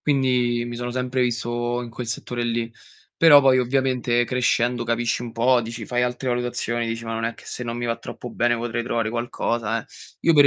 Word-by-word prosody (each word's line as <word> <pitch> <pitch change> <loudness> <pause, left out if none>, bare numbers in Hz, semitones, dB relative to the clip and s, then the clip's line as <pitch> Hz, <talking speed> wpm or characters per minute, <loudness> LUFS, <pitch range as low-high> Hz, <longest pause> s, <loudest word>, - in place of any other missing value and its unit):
Quindi 125 -4 +2
mi 120 - -5
sono 120 0 -4
sempre 125 +1 -1
visto 120 0 -1
in 120 - -8
quel 120 +1 -6
settore 120 +1 -3
lì, 115 0 -1 0.4
però 150 -3 +8
poi 130 -1 +5
ovviamente 125 -2 +1
crescendo 120 -1 +1
capisci 115 0 0
un 120 - -6
po', 120 +2 +3
dici 115 -1 -6
fai 125 +2 0
altre 125 +1 -1
valutazioni, 120 -1 -1
dici: 115 0 -4
"Ma 115 - -4
non 115 0 -2
è 115 0 -2
che - - -16
se - - -6
non 120 -1 -4
mi 120 - -3
va 115 -1 0
troppo 120 - -8
bene 120 0 +1
potrei 120 0 -2
trovare 115 -2 -1
qualcosa, 115 -1 -1
eh". - - -22 0.4
Io 165 - +6
per 145 -2 +7
120 Hz, 210 wpm, -23 LUFS, 115-125 Hz, 0.4 s, però